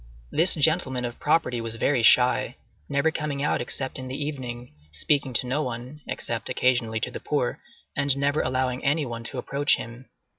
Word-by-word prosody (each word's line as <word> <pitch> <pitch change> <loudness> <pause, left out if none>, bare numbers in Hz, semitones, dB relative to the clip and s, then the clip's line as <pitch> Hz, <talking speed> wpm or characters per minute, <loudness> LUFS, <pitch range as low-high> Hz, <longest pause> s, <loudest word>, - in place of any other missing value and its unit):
This 170 +4 +3
gentleman 145 -5 +2
of 120 0 -6
property 150 -6 +1
was 115 0 -2
very 125 +2 +1
shy,—never 125 - +2
coming 150 -3 -3
out 150 - +1
except 130 +2 -2
in 130 - -6
the 130 +2 -4
evening, 125 - -5 0.2
speaking 135 - +1
to 120 - +1
no 135 +5 0
one, 125 +3 -6
except, - - -4
occasionally 120 -3 +1
to - - -2
the - - -6
poor, - - -1 0.4
and 140 -1 +3
never 140 +2 +1
allowing 130 0 -1
any 145 +2 +2
one 115 -2 -6
to 130 - -5
approach 140 +3 +2
him. 115 +3 -9
130 Hz, 175 wpm, -25 LUFS, 120-145 Hz, 0.4 s, This